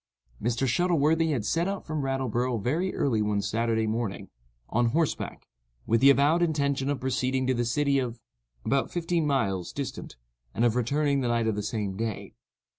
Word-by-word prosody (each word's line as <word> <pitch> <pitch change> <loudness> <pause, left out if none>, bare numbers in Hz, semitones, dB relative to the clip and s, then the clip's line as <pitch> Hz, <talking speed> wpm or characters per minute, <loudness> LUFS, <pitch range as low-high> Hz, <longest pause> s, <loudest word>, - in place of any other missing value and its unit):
Mr. 120 +4 0
Shuttleworthy 160 +2 +2
had 125 -9 -1
set 165 - +1
out 200 0 -4
from 155 -2 -2
Rattleborough 130 -2 -1
very 160 - 0
early 115 -6 +1
one 105 -1 0
Saturday 110 +2 0
morning, 110 -3 -3 0.4
on 120 +1 +1
horseback, 155 +6 -1 0.4
with 115 +1 +2
the 135 - +8
avowed 145 +5 +4
intention 140 -4 0
of 145 -2 -1
proceeding 130 +1 0
to 130 - +2
the 120 -1 0
city 140 +3 +1
of 120 -2 -3 0.2
——, - - -39
about 135 0 +1
fifteen 170 -2 0
miles 100 -10 0
distant, - - -6 0.4
and 115 - +2
of 120 -1 +2
returning 140 +3 +1
the 125 - 0
night 115 -1 +1
of 110 - +1
the 105 - -2
same 105 -2 -3
day. 110 -2 -4
130 Hz, 180 wpm, -27 LUFS, 115-145 Hz, 0.4 s, the